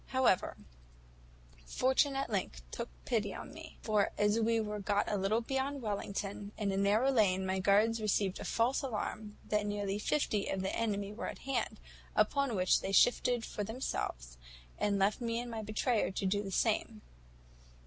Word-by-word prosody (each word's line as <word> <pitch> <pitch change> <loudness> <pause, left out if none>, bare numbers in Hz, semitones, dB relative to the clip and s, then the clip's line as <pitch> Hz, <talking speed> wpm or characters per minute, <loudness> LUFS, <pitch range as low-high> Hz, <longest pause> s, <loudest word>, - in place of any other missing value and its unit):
However, 260 -8 +2 1.1
fortune 265 - +2
at 270 -3 -2
length 180 - -2
took - - -4 0.2
pity - - 0
on - - -8
me; - - -11
for 210 -2 +2
as 210 +2 +3
we 230 0 +2
were 210 -1 -3
got 205 0 +1
a - - 0
little 200 +4 +1
beyond 270 +2 -2
Wellington, 200 -1 -3
in 205 -2 0
a - - -1
narrow 210 +7 +3
lane, 190 -6 +3
my 190 0 0
guards 215 +4 +3
received 200 -2 +1
a - - -5
false 240 +3 +1
alarm, 215 -4 -4
that 210 -1 0
near 205 0 -2
fifty 215 -4 0
of 190 -1 -2
the 190 - -1
enemy 205 -3 -1
were 220 - -5
at - - -8
hand; 275 -1 -1 0.4
upon 275 -5 +2
which 185 -1 +3
they 195 - -3
shifted 245 +3 +4
for 210 - -4
themselves, - - -4 0.4
and 205 -1 +1
left 195 +5 +2
me 230 -1 -1
and 240 0 -5
my 225 -1 -3
betrayer 215 +2 0
to 195 - -3
do 205 +2 +1
the 200 - -5
same. 215 +2 0
210 Hz, 175 wpm, -33 LUFS, 200-230 Hz, 1.1 s, shifted